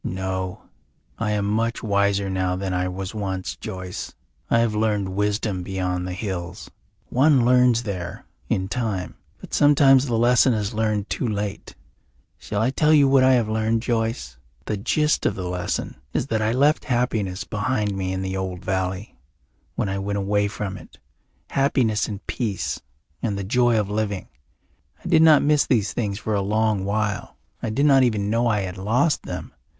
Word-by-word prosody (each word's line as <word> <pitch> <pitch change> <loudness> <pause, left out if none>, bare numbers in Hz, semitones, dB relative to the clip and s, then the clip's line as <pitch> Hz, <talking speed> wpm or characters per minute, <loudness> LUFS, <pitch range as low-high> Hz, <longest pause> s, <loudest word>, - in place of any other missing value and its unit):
"No. 95 0 -3 0.6
I 115 -2 -1
am 105 -1 0
much 115 +3 -1
wiser 100 -1 +1
now 95 -1 -1
than 95 0 -3
I 90 0 0
was 95 +2 -5
once, 95 -3 -3
Joyce. 90 -1 -7 0.3
I - - +4
have 115 -2 +2
learned 105 -3 0
wisdom 105 0 -1
beyond 90 -1 -2
the 90 - -4
hills. 90 -3 -5 0.4
One 135 -1 +4
learns 125 -1 +4
there 90 -5 -5 0.2
in 95 0 0
time 105 -5 -3 0.3
but - - -12
sometimes 140 -2 +5
the 115 -2 0
lesson 120 +1 +4
is 105 +1 -2
learned 110 -2 0
too 125 - -1
late. 105 -2 -4 0.6
Shall 105 +1 -2
I 125 - +2
tell 150 +3 +2
you 145 -3 +6
what 135 -1 +5
I 130 0 +6
have 120 -4 +2
learned, 110 +1 0
Joyce? 115 - -2 0.3
The 105 - -1
gist 150 +9 +1
of - - -1
the 90 -2 -4
lesson 90 -6 -3 0.2
is - - 0
that 110 - +1
I 110 +1 +1
left 145 +5 +2
happiness 110 -7 -1
behind 105 -2 -1
me 95 -1 -2
in 95 0 -2
the 95 0 -3
old 95 -2 -4
valley, 95 +2 -2 0.6
when - - -1
I 95 0 -2
went 100 +1 -2
away 100 +1 +1
from 100 -1 -5
it, - - -15 0.5
happiness 130 -6 +1
and 100 -2 -7
peace 105 -7 -3 0.4
and 105 -4 -1
the 100 - -3
joy 120 +3 +3
of 105 - -1
living. 105 -2 -2 0.8
I - - -3
did 160 -2 +5
not 155 -2 +7
miss 150 0 +3
these 110 -6 +1
things 105 -4 -2
for 110 +1 -3
a 100 - +1
long 105 -1 +1
while; 105 0 -2 0.2
I 115 - -2
did 135 +7 +1
not 135 -2 +6
even 105 -5 +1
know 115 +2 +2
I 105 -3 +1
had 95 -1 -5
lost 125 - +1
them. - - -6
105 Hz, 180 wpm, -23 LUFS, 95-120 Hz, 0.8 s, not